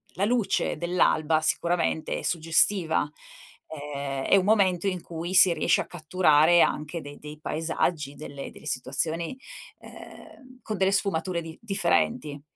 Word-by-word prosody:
la 195 - 0
luce 215 -3 0
dell'alba 165 -3 +1
sicuramente 170 -1 0
è - - -7
suggestiva, 165 0 +2 0.6
ehm, 140 -3 -5
è - - +4
un 185 - +1
momento 195 -3 +2
in 185 -2 -1
cui 170 +2 -6
si 185 -1 +7
riesce 155 - +2
a - - -6
catturare 170 0 +3
anche 155 +3 -1
dei 145 0 -11
dei 150 0 -10
paesaggi, 155 -2 -2
delle 140 -2 -8
delle - - -15
situazioni, 160 - -2 0.4
ehm, 255 -3 -14
con 215 -2 -4
delle 190 +1 +2
sfumature 185 -3 -1
di 165 -1 -10
differenti. 155 - 0
165 Hz, 140 wpm, -26 LUFS, 150-185 Hz, 0.6 s, si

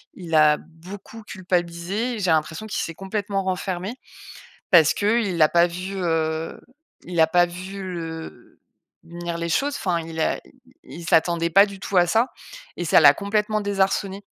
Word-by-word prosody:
il 170 -3 -8
a 150 -1 +6
beaucoup 190 +8 -12
culpabilisé. 185 +5 -2
J'ai 185 -4 +1
l'impression 160 +5 0
qu'il 215 - -3
s'est 165 - -5
complètement 195 +1 -3
renfermé, 185 +2 -3 0.8
parce 160 -4 +6
qu'il 205 -4 0
a 155 - +6
pas 170 0 +4
vu 180 +3 -6
heu 160 -2 -1 0.5
il 175 -1 -4
a 160 - +6
pas 175 +2 +4
vu 185 +3 -8
le 165 -7 -8 0.5
venir 170 0 -6
les 170 0 -3
choses, 280 - 0
enfin 175 -7 -1
il 160 0 -7
a - - +1
i - - -26 0.4
i - - -11
il 170 - -9
s'attendait 170 0 +2
pas 195 +4 +7
du 200 -2 -10
tout 195 - -5
à 175 0 +5
ça 225 +7 +2 0.5
et - - -3
ça - - +5
l'a 145 -2 +8
complètement 210 +1 -1
désarçonné. 195 0 -1
180 Hz, 170 wpm, -23 LUFS, 165-200 Hz, 0.8 s, l'a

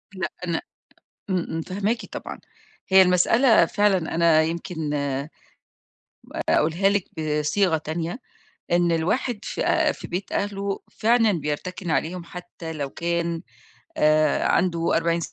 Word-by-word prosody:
لأ، 185 -2 -3 0.2
أنا 170 -1 -1 0.7
امم، 180 -2 0
امم 165 - -3
فاهماكِ 205 +7 -2
طبعًا، - - -7 0.5
هي 190 0 +7
المسألة 185 +4 +4
فعلًا 195 -4 +1
أنا 165 -1 +4
يمكن 160 -1 -3 1.4
با - - -5
أقولها 165 +6 +3
لِك 200 -2 +1 0.2
بصيغة 155 +4 +1
تانية، 165 - -4 0.5
إن 175 0 +3
الواحد 210 +8 0
في - - -3
آآ، - - +3
في - - -9
بيت 185 +3 -4
أهلُه 200 -1 -2
فعلًا 225 -1 +3
بيرتكِن 170 +3 -4
عليهم 165 +5 -1
حتى 175 -2 -8
لو 145 -3 -4
كان 170 0 -2 0.6
آآ، 155 0 +3
عنده 170 -2 +1
40 170 0 +1
170 Hz, 125 wpm, -24 LUFS, 160-195 Hz, 1.4 s, هي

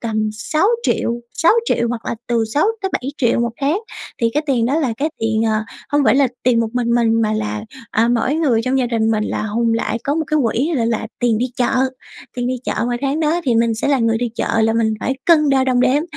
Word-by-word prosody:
tầm 215 -2 -1
sáu 305 - 0 0.2
triệu 235 - 0 0.2
sáu 335 - +4
triệu 235 - 0
hoặc 235 -1 -4
là - - -1
từ 235 -2 +1
6.000.000-7.000.000 295 - 0
một 235 - 0
tháng. 295 +8 +1 0.4
Thì 230 -1 +2
cái 300 - +1
tiền 240 -4 +1
đó 285 +5 +1
là 260 -7 0
cái 300 +4 0
tiền, 220 0 0
ờ, 220 -1 +1 0.3
hông 290 -1 +2
phải 220 - +4
là 270 -2 +4
tiền 240 -2 +3
một 225 - 0
mình 240 -1 0
mình 230 -1 +2
mà 215 -1 +1
là, 215 0 -3 0.3
à, 230 +2 +2
mỗi 245 +4 +1
người 275 -9 +2
trong 265 +1 +1
gia 250 - +1
đình 225 -2 0
mình 215 -1 0
là - - -2
hùn 230 +2 0
lại, 230 0 -1
có 285 - 0
một 320 -1 -1
cái 305 - +1
quỹ 255 +8 0
l - - 0
là 225 -1 -1
tiền 235 -3 +2
đi 250 - 0
chợ. 245 - +1 0.6
Tiền 245 0 -1
đi 255 - 0
chợ - - -2
mà 240 - -1
tháng 280 +3 -1
đó 320 +3 +1
thì 245 -4 +2
mình 230 0 +2
sẽ 225 - -2
là 275 -2 +3
người 225 -1 +1
đi 245 - -1
chợ 225 0 0
là 225 - +2
mình 225 -1 +1
phải 265 - -1
cân 305 -4 +4
đo 265 -1 +3
đong 250 -1 +2
đếm, 280 +4 +3
240 Hz, 250 wpm, -18 LUFS, 225-280 Hz, 0.6 s, sáu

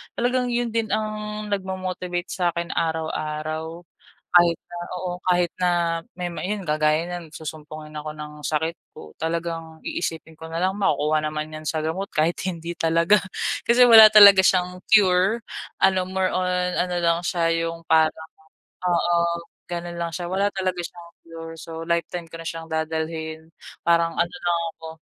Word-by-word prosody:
Talagang 250 +1 +1
yun 240 -1 -1
din 225 -1 0
ang 215 0 -4
nag-mo-motivate 185 -2 -3
sa 175 -2 0
akin 170 +1 -3
araw-araw. 160 0 -3 0.5
Kahit 170 -1 +6
na - - -10 0.2
oo, 180 0 -3
kahit 180 -1 +2
na 180 -1 +1 0.5
may 180 - -2
may 175 +3 -4
yun 205 -3 -4
kagaya 155 +2 +2
niyan 175 -3 -7
susumpungin 155 0 -8
ako 150 0 -5
ng 150 0 -10
sakit 160 +2 -1 0.2
ko, 75 - -13
talagang 165 0 -4
iisipin 160 -2 -4
ko 160 +1 -10
nalang, 185 +4 0
"Makukuha 155 -5 +1
naman 155 0 -3
'yan 155 - -8
sa 155 +1 -1
gamot," 165 +6 -3
kahit 160 +3 +1
hindi 170 -2 -4
talaga, 165 +4 +3 0.5
kasi 245 +1 +6
wala 220 -2 +10
talaga 200 -3 +9
siyang 180 -1 +1
cure, 195 0 +5 0.4
ano 190 -1 +3
more 190 0 -1
on 180 0 0
ano 180 0 0
lang 170 -1 +2
siya 170 0 0
'yung 165 0 -3
parang 160 0 +2 0.6
oo. 170 0 +1 0.3
Gano'n 175 0 -5
lang 170 - -1
siya, 170 +2 -5
wala 195 +3 0
talaga 185 -3 -2
siyang 170 0 -9
cure. 165 0 -9
So, 165 0 -8
lifetime 170 +1 -2
ko 165 0 -10
na 165 - -6
siyang 165 0 -5
dadalhin. 160 0 -4 0.3
Parang 170 0 +2
ano 170 0 0
lang 175 -1 +1
ako, 160 - -11
170 Hz, 160 wpm, -23 LUFS, 160-185 Hz, 0.6 s, wala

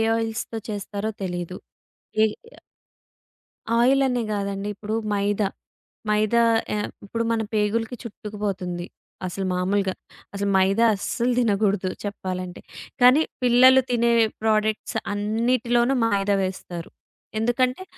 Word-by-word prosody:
ఆయిల్స్‌తో 225 0 -3
చేస్తారో 205 0 -3
తెలీదు. 180 -1 -4 0.7
ఏ - - +7 0.3
ఆ - - -18 1.2
ఆయిలనే 260 0 +3
గాదండి 200 0 -3
ఇప్పుడు 210 +2 -5 0.2
మైదా, 205 0 +1 0.6
మైదా 215 +2 +3 0.3
ఆహ్, 210 - -2 0.2
ఇప్పుడు 230 +3 -2
మన 225 -1 +1
పేగులకి 220 +3 0
చుట్టుకు 210 -2 -8
పోతుంది. 180 -3 -3 0.4
అసలు 190 +2 -3
మామూలుగా 190 +1 0 0.4
అసలు 200 0 -1
మైదా 195 +4 +3
అస్సలు 240 +5 -1
తినగూడదు 205 -4 +1
చెప్పాలంటే. 185 -3 -5 0.4
కానీ 250 +5 +7 0.2
పిల్లలు 255 +2 +7
తినే 235 -1 +2 0.3
ప్రోడక్ట్స్ 215 0 +1 0.2
అన్నిటిలోనూ 235 +4 +1
మైదా 200 -2 +2
వేస్తారు. 180 -2 -5 0.5
ఎందుకంటే 250 +7 +1
210 Hz, 105 wpm, -24 LUFS, 195-235 Hz, 1.2 s, ఏ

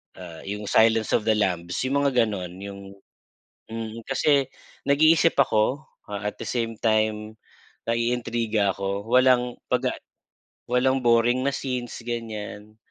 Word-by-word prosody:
ah, 85 -3 -10
yung 105 +1 -4
Silence 110 0 +3
of - - +1
the - - +5
Lambs, 90 -4 -1
yung 140 +2 +1
mga 135 -4 +3
gano'n, 95 -5 -4
yung 100 0 -9 0.8
mm. 115 0 -6
Kasi 140 0 +2 0.4
nag-iisip 155 +4 +4
ako, 125 +6 +2 0.2
ah, 100 -1 -4
at - - -24
the - - -6
same 115 -2 -2
time, 110 -1 0 0.5
naiintriga 115 -3 0
ako, 100 +1 -3
walang 125 -1 +4 0.2
'pag, - - +1
ah, - - -12 0.7
walang 130 +2 +3
boring 120 +1 +3
na - - +3
scenes, 125 -3 -4
ganiyan. 110 -2 -6
115 Hz, 135 wpm, -25 LUFS, 105-125 Hz, 0.8 s, the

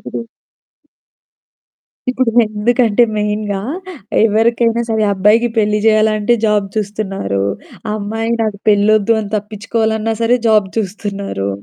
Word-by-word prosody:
ఇప్పుడూ - - -6 1.9
ఇప్పుడు 255 -2 0
ఎందుకంటే 220 +2 +1
మెయిన్‌గా 210 -1 -2 0.7
ఎవరికైనా 230 +2 +2
సరే 220 -1 0
అబ్బాయికి 210 +5 +3
పెళ్లి 210 0 +2
చేయాలంటే 215 +1 +3
జాబ్ 210 -2 +1
చూస్తున్నారు. 195 - -2 0.5
అమ్మాయి 225 +2 -3
నాకు 210 -2 -2
పెళ్ళోద్దు 210 +1 +3
అని 205 - -6
తప్పించుకోవాలన్నా 220 +1 -2
సరే 240 +2 +3
జాబ్ 215 -3 +4
చూస్తున్నారు. 200 - -3
215 Hz, 100 wpm, -16 LUFS, 205-225 Hz, 1.9 s, జాబ్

